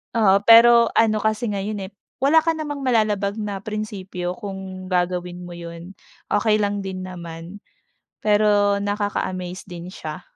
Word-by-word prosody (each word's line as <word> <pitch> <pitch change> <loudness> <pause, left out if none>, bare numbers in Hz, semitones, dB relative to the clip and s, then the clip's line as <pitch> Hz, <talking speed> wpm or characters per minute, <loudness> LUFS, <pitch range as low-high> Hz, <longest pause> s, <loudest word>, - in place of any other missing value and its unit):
Oo, 200 -2 +4
pero 235 +1 +7
ano 215 -2 +2
kasi 220 +2 0
ngayon, 200 -1 -3
eh, - - -16 0.3
wala 310 +4 +4
ka 330 - +2
namang 295 -3 -5
malalabag 215 -4 +1
na 205 -2 -4
prinsipyo 195 -4 -4
kung 190 -3 -8
gagawin 180 0 -1
mo 175 - -9
'yun. 170 +2 -9 0.3
Okey 215 +1 +2
lang 205 -1 -1
din 190 -1 -5
naman. 170 +2 -9 0.6
Pero 205 -1 +3
nakaka-amaze 200 -3 -3
din 175 -2 -8
siya. - - -7
205 Hz, 140 wpm, -22 LUFS, 185-215 Hz, 0.6 s, pero